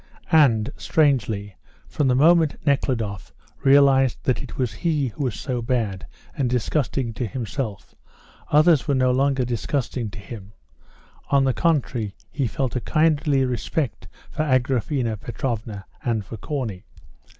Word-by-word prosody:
And, 135 -7 +4
strangely, 110 -10 +1 0.3
from 145 - 0
the 125 - +3
moment 160 +2 +4
Nekhludoff 115 -8 -1 0.3
realised 135 -2 +5
that 130 - 0
it 130 - -9
was 125 -4 -1
he 145 +2 0
who 140 +5 -4
was 120 -5 -3
so 125 -3 -3
bad 115 -6 -2 0.3
and 130 -3 0
disgusting 125 0 -1
to 120 +1 -3
himself, 115 -1 -5 0.6
others 155 0 +5
were 140 - +2
no 130 -1 +3
longer 135 0 +1
disgusting 120 0 -2
to 115 - -11
him; 100 -1 -10 0.8
on 140 -1 +4
the 135 -1 +2
contrary, 125 - 0 0.2
he 135 -4 -1
felt 130 +2 -2
a 125 - -1
kindly 150 -3 +2
respect 125 +1 -3 0.2
for - - -2
Agraphena 130 -3 0
Petrovna, 110 -3 -4 0.2
and 110 -4 -1
for 115 - -8
Corney. 110 -5 -4
130 Hz, 140 wpm, -23 LUFS, 115-140 Hz, 0.8 s, realised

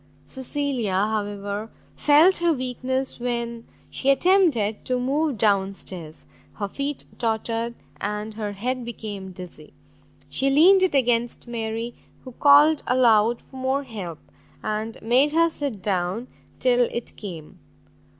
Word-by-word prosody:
Cecilia, 260 - -2
however, 205 +1 -2 0.3
felt 310 +6 +5
her 345 -1 +2
weakness 260 0 -2
when 235 -1 -3 0.2
she 275 - -1
attempted 275 - +3
to 255 -1 0
move 280 +1 0
down 200 -2 +2
stairs; 165 -5 -8 0.3
her 205 - -3
feet 280 +6 -3
tottered, 230 0 -1 0.2
and 210 +2 -4
her 210 -1 -4
head 250 +5 -3
became 205 -5 -6
dizzy; 175 -4 -11 0.5
she 265 - 0
leaned 350 +8 +6
it 375 -6 +2
against 240 -2 +1
Mary, 230 0 -3 0.3
who 255 - -9
called 290 +4 +6
aloud 235 -2 +3
for 265 - -14
more 265 +2 0
help, 200 - -7 0.5
and 215 +1 -3
made 260 +6 +3
her 335 +1 +4
sit 270 -11 -4
down 190 +4 -1 0.3
till 245 -1 +3
it 235 - -5
came. 170 -7 -9
235 Hz, 130 wpm, -24 LUFS, 210-270 Hz, 0.5 s, leaned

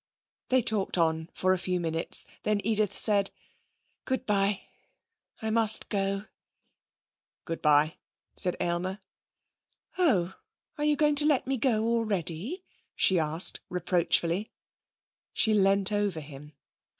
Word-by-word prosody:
They 260 -1 +3
talked 215 -5 +1
on 160 -1 0
for 185 0 +1
a 185 - -1
few 180 0 -2
minutes. 165 -1 0 0.2
Then 210 -1 0
Edith 215 -2 0
said: 200 -2 +4 0.8
'Good 260 0 -2
bye. 200 -2 +1 0.8
I 220 - -1
must 220 -1 +2
go.' 195 0 -1 1.2
'Good 165 -1 -5
bye,' 150 +1 +3 0.4
said 180 - +3
Aylmer. 180 +2 -2 1.0
'Oh! 190 - +2 0.5
Are 295 - 0
you 300 0 +3
going 295 0 +2
to 295 - +5
let 290 -4 +2
me 270 +1 -1
go 230 -3 +1
already?' 225 - -1 0.3
she 185 -2 +4
asked 160 +3 +2
reproachfully. 180 +2 0 0.8
She 220 - +2
leant 195 -1 +2
over 205 -5 -1
him. 150 0 -11
195 Hz, 125 wpm, -28 LUFS, 170-220 Hz, 1.2 s, to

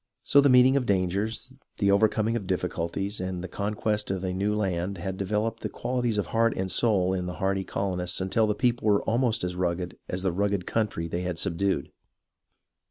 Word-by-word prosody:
So 140 - +5
the 140 - +4
meeting 130 +1 +6
of 130 -3 +1
dangers, 100 +3 -1 0.2
the 100 - +3
overcoming 110 +2 +2
of 105 -5 -3
difficulties, 90 +2 -2
and 95 -1 -4
the - - -4
conquest 105 +1 -2
of 95 -1 -2
a 90 -1 -1
new 100 +3 0
land 95 -2 -1
had 95 +2 -4
developed 105 +4 -2
the - - -3
qualities 120 -3 -1
of 105 - 0
heart 115 0 +2
and 95 0 -2
soul 95 -2 +2
in 90 -1 -2
the 90 - -5
hardy 95 -1 0
colonists 90 -2 -2
until 95 +4 +1
the 105 - 0
people 120 +1 0
were 100 -1 +3
almost 115 -1 +1
as 90 0 -2
rugged 90 0 -2
as 90 +1 -3
the 95 - +1
rugged 100 0 0
country 105 -7 -1
they 85 +2 -3
had 90 -2 -3
subdued. 85 -2 -1
100 Hz, 195 wpm, -27 LUFS, 90-110 Hz, 0.2 s, meeting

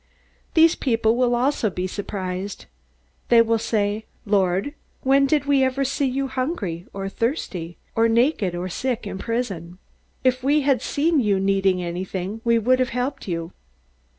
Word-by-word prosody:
"These 330 0 +6
people 225 -3 +1
will 245 -1 +2
also 245 -2 +1
be 180 -1 -3
surprised. 190 0 -5 0.6
They 235 - +7
will 230 0 +1
say: 215 -1 -1 0.2
'Lord, 195 +4 +1 0.3
when 275 +1 +4
did 290 0 +1
we 280 -2 +3
ever 260 +1 +1
see 275 +1 0
you 270 +1 -1
hungry, 255 - -3
or 195 0 -4
thirsty, 195 - -3 0.2
or 230 0 +3
naked, 230 - +2
or 175 +1 -3
sick, 240 +5 -2
or 200 - -5
in 190 - -6
prison? 195 -7 -3 0.5
If 255 0 +2
we 290 +3 +3
had 275 -2 +2
seen 315 +2 +1
you 205 -5 +2
needing 195 -1 +2
anything, 185 +4 -4
we 235 -1 +3
would 255 +3 +3
have 255 -1 +1
helped 250 +2 -3
you!' 165 -2 -3
230 Hz, 160 wpm, -23 LUFS, 190-260 Hz, 0.6 s, They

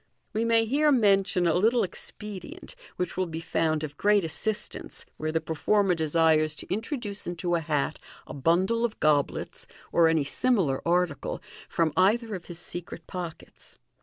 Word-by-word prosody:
We 220 +2 0
may 230 -1 +3
here 295 +6 +3
mention 195 -6 +3
a 165 - +3
little 225 +8 +3
expedient 210 - -6 0.2
which 180 - -3
will 185 0 0
be 160 -1 -5
found 160 -1 0
of 145 -1 -6
great 205 -1 +3
assistance 210 +7 -3
where 155 0 -2
the 160 - +1
performer 190 +5 +1
desires 160 -1 +2
to - - -5
introduce 220 -1 -3
into 175 0 -2
a 170 - +3
hat 150 -3 -1 0.3
a - - -9
bundle 180 - +2
of 235 -2 -2
goblets 150 -2 0 0.2
(or 170 -1 +5
any 160 -2 +3
similar 180 - +1
article) 175 -5 0 0.3
from 165 -3 +1
either 220 +4 +3
of 180 -3 -6
his 175 - -7
secret 175 -1 -6
pockets. 175 -3 -8
180 Hz, 160 wpm, -27 LUFS, 160-210 Hz, 0.3 s, or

